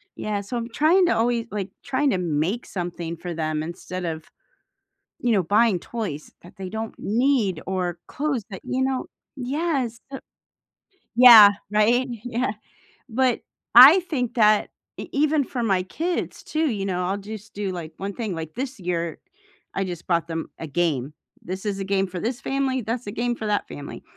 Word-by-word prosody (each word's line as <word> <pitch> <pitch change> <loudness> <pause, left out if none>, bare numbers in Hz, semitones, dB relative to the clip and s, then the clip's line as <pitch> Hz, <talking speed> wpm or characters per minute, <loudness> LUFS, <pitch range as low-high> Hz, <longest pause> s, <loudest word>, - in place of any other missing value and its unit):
yeah, 210 -1 -2
so 205 +5 -5
I'm 230 - -3
trying 320 +10 +4
to 350 - +3
alway 230 0 +1
like, 205 -2 -4
trying 280 +1 +1
to 220 - +1
make 175 +6 -1
something 175 -2 -4
for 175 +1 -6
them 155 -1 -2
instead 180 +2 -6
of, 160 -2 -4 0.9
you 240 - +1
know, 195 -4 +3
buying 205 +2 +3
toys 185 -9 -5
that 175 - -15
they 190 -1 -5
don't 220 +3 -5
need, 225 - +1
or 180 -2 -2
clothes 275 -6 -2
that, 190 - -7
you 260 +1 -1
know 265 -1 -1 0.3
Yes, 265 -3 -1
the 270 - -6 1.0
Yeah. 230 -4 +11 0.2
Right, 235 +5 +3 0.2
yeah 245 0 -1 0.6
But 255 +1 +1 0.3
I 275 +9 +11
think 280 -10 -3
that 215 -2 +4 0.3
e - - -6
even 300 0 +2
for 250 -1 -4
my 190 -5 +2
kids 335 - -3
too, 315 0 0
you 200 -3 -3
know, 180 -2 -1
I'll 195 +2 -1
just 210 +1 -9
do, 200 -2 -3
like, 165 -3 -6
1 200 +1 -4
thing, 220 -4 -3
like, 160 -2 -6
this 265 0 -4
year, 170 -3 -2 0.6
I 195 - 0
just 175 -2 -7
bought 170 -2 +1
them 165 -1 -4
a - - -5
game, 150 -4 -1 0.3
"This 190 +3 -6
is 200 -1 -1
a - - -2
game 195 0 +1
for 180 -1 -6
this 240 +7 -3
family, 265 -1 0
that's 230 +3 -3
a - - -3
game 240 +2 -1
for 220 - -6
that 205 -1 0
family." 145 - -8
210 Hz, 180 wpm, -24 LUFS, 180-250 Hz, 1.0 s, Yeah